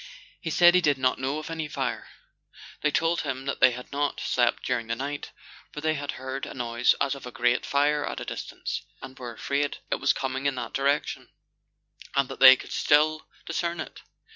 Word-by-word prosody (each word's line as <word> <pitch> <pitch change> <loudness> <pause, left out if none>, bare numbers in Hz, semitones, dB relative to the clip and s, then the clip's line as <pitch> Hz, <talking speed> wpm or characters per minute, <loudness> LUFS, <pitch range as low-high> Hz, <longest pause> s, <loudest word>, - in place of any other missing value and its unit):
He 165 - -4
said 175 +2 +6
he 180 - +5
did 145 -5 +2
not 130 -1 +1
know 135 +3 -1
of 155 +1 -6
any 160 -1 -3
fire. 135 -4 -3 0.7
They 150 - +2
told 165 +3 +1
him 135 -2 -4
that 140 - -3
they 130 - +7
had 125 0 -8
not 145 0 -1
slept 120 -1 +1
during 120 -3 -1
the 115 - -1
night, 140 +3 -5 0.4
for - - -7
they 155 +1 +1
had 145 -1 -4
heard 130 +1 -5
a - - -8
noise 120 -1 +2
as 140 -1 +1
of 135 -3 -8
a - - -7
great 120 +1 +1
fire 145 +1 +2
at - - -4
a - - -6
distance, - - -5 0.2
and 130 0 -10
were 120 -2 -6
afraid 140 +4 -1
it - - 0
was - - +3
coming 135 +1 -2
in 140 - 0
that 125 - -5
direction, 140 +2 0 0.9
and 140 -2 +2
that - - -8
they 130 -1 +11
could - - -11
still 155 +1 +2 0.2
discern 170 0 -2
it. - - -7
140 Hz, 210 wpm, -26 LUFS, 130-150 Hz, 0.9 s, they